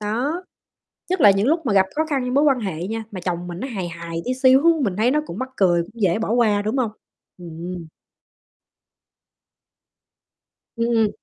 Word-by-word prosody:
Đó, 250 - -2 0.7
nhất 370 -4 0
là 205 - +8
những 195 +4 +1
lúc 325 0 +1
mà 215 - +1
gặp 190 -1 +5
khó 315 +1 +1
khăn 275 -3 0
với 250 0 -3
mối 285 +3 +3
quan 270 -4 +3
hệ 180 -4 -4
nha, 225 +1 -4
mà 190 - -6
chồng 175 -1 -3
mình 175 +1 -6
nó 265 - -4
hài 195 -9 -4
hài 170 0 -6
tí 255 - 0
xíu, 260 +1 +5 0.2
mình 195 -5 -1
thấy 235 +4 +3
nó 300 +1 +2
cũng 190 - -7
mắc 260 0 -3
cười, 175 -3 +3
cũng 230 +6 -13
dễ 190 0 +2
bỏ 225 -1 -2
qua, 220 -4 +3
đúng 215 +6 -2
hông? 235 -4 0 0.5
Ừm. 170 0 -7 2.9
Ừm. 230 -2 +2
215 Hz, 190 wpm, -22 LUFS, 180-255 Hz, 2.9 s, là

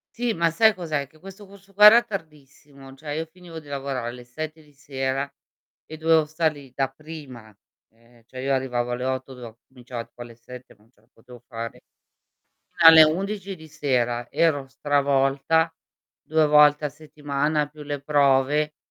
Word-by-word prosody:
Sì, 240 -1 -1
ma 170 -2 +1
sai 220 +5 +4
cos'è? 155 -6 -3
Che 155 +2 -24
questo 195 +2 -12
corso 195 0 -18
qua 210 +2 +6
era 230 +3 +9
tardissimo, 145 -6 -10
cioè 150 +1 -9
io 160 +2 -3
finivo 165 -1 -12
di 145 - -16
lavorare 135 -4 -4
alle 125 0 -10
7 155 +5 -7
di 150 -1 -23
sera 135 0 -4 0.5
e 155 - -10
dovevo 160 0 +3
stare 155 0 -1
lì 135 -3 -14
da 135 -1 0
prima, 135 -8 -12 0.3
e 115 0 -26
cioè 130 0 -9
io 135 +1 0
arrivavo 125 -2 -1
alle 125 +1 -3
8, 130 0 -3
do 115 -2 -12
cominciava 125 -2 -8
poi 120 - -9
alle 115 -1 -14
7, 125 +1 -13
non 110 +3 -28
ce 105 - -34
la 110 - -31
potevo 120 +1 -16
fare. 115 -1 -7 0.9
Fino 165 -1 +8
alle 160 -1 +9
11 195 +4 -2
di 160 -1 -14
sera 125 -5 -1
ero 145 -5 +1
stravolta, 140 +3 +1 0.5
2 155 -1 +2
volte 150 0 +5
a 145 - -1
settimana 150 0 -2
più 150 0 -12
le 145 -1 -5
prove, 145 +1 +2
145 Hz, 175 wpm, -24 LUFS, 130-160 Hz, 0.9 s, era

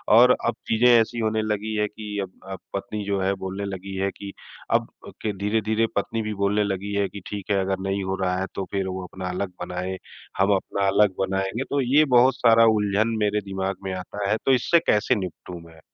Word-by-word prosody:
और 125 +2 +8
अब 120 - +1
चीज़ें 115 +2 +3
ऐसी 120 0 +4
होने 110 -1 0
लगी 110 0 -2
हैं 105 0 +1
कि 105 -1 -7
अब 95 - -8 0.2
अ, 95 - -4 0.2
पत्नी 105 +1 -4
जो 100 -1 0
है 95 +1 +1
बोलने 95 +2 -4
लगी 95 0 -6
है 95 0 0
कि 100 -1 -7 0.4
अब - - +2 0.3
के 110 - -1
धीरे-धीरे 110 +2 +1
पत्नी 110 +3 -1
भी 110 -1 -3
बोलने 100 +1 +1
लगी 100 0 -3
है 100 -1 +1
कि 100 - -9
ठीक 100 -1 -5
है, 100 - +3
अगर 95 0 -1
नहीं 100 0 -1
हो 95 0 -2
रहा 90 -1 +1
है 95 - -1
तो 95 - -3
फिर 95 -1 -1
वो 95 0 -4
अपना 95 0 -6
अलग 90 +1 -3
बनाए 90 0 -4 0.5
हम 95 +2 +3
अपना 100 +1 -1
अलग 100 0 +4
बनाएँगे 95 +5 -1
तो 140 -1 +1
ये 140 +5 +4
बहुत 125 +2 +6
सारा 115 -1 +5
उलझन 105 +2 +1
मेरे 105 0 +1
दिमाग 95 -1 -3
में 95 -1 -3
आता 100 +2 -4
है। 105 - +3
तो - - +4
इससे 130 +7 +4
कैसे 105 +4 +3
निपटूँ 90 -3 -6
मैं? 80 -1 -16
100 Hz, 220 wpm, -24 LUFS, 95-110 Hz, 0.5 s, और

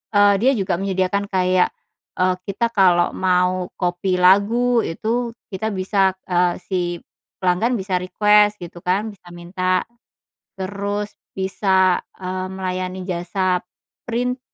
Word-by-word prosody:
eee, 205 0 +6
dia 255 +6 +4
juga 190 -4 0
menyediakan 195 0 0
kayak, 185 -1 +3 0.5
eee, 185 0 +3 0.2
kita 235 +4 0
kalau 180 -5 +4
mau 180 0 +1
copy 180 +1 0
lagu 225 +6 +4
itu 230 +7 -2 0.2
kita 215 +3 -3
bisa, 190 0 +2 0.2
eee, 175 -1 +2
si, 185 -2 -2 0.6
pelanggan 185 +7 +2
bisa 190 -1 -2
request 210 +3 +3
gitu 175 0 -9
kan 190 +4 +1
bisa 190 -3 -19
minta, 185 +1 -1 0.7
terus 200 +2 -3 0.2
bisa, 190 -1 +2 0.2
eee, 185 0 -4
melayani 185 0 -4
jasa, 180 0 -1 0.5
print, 250 +2 -1
190 Hz, 120 wpm, -21 LUFS, 180-205 Hz, 0.7 s, eee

